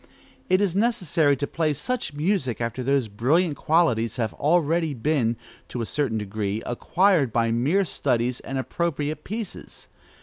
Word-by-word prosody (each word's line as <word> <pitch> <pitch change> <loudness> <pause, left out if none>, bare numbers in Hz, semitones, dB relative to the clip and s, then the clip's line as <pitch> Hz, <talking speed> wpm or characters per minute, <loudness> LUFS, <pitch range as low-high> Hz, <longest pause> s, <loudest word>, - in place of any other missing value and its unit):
It 185 +2 +4
is 190 -4 +1
necessary 180 - +2
to 145 - -1
play 155 0 -1
such 235 - -2
music 150 - 0
after 115 +2 -3
those 135 -1 +1
brilliant 145 - +1
qualities 130 -9 +2
have 115 -4 -2
already 160 0 +1
been, 120 -2 +1 0.3
to 125 - -6
a 115 - -1
certain 135 -3 -1
degree, 105 0 -3
acquired 170 - +2
by 115 0 +1
mere 145 +13 +2
studies 125 -5 0
and 135 - -5
appropriate 150 +1 -2
pieces. 215 0 -7
145 Hz, 145 wpm, -24 LUFS, 120-170 Hz, 0.3 s, It